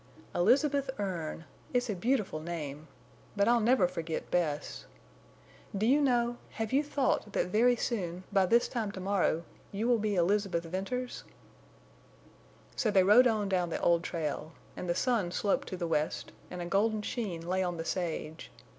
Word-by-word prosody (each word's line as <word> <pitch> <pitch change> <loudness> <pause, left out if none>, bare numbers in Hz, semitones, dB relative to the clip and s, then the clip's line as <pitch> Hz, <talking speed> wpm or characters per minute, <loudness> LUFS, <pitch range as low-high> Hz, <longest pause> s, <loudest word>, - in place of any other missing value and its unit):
"Elizabeth 275 - +3
Erne! 170 -5 -3 0.3
It's 245 0 +2
a 215 - -1
beautiful 210 -4 0
name. 155 -2 -6 0.5
But 200 -1 +2
I'll 240 0 +5
never 230 -4 +4
forget 165 -2 -5
Bess. 155 -4 -1 0.9
Do 210 - +1
you 275 +5 +4
know—have 240 -3 -1
you 280 +2 +4
thought 275 -7 0
that - - 0
very 240 +5 +4
soon—by 190 -3 -1
this 235 +5 +4
time 220 -5 -2
to 190 - -7
morrow—you 195 +2 -1
will 240 -2 +3
be 210 -1 0
Elizabeth 185 -1 +1
Venters?" 195 +9 -4 1.5
So 225 - +1
they 195 -3 +5
rode 225 +7 +7
on 215 -3 0
down 180 -3 0
the - - -2
old 170 -1 +3
trail. 160 -2 -4 0.2
And 180 - -5
the 175 - +1
sun 230 -5 +1
sloped 200 +2 0
to 185 - -5
the 175 - -2
west, 155 -2 -1 0.2
and 180 -1 -5
a - - -5
golden 210 +4 +1
sheen 185 -9 -4
lay 185 +1 +1
on 175 -2 -1
the 165 - -4
sage. 165 -3 -3
195 Hz, 160 wpm, -31 LUFS, 175-235 Hz, 1.5 s, rode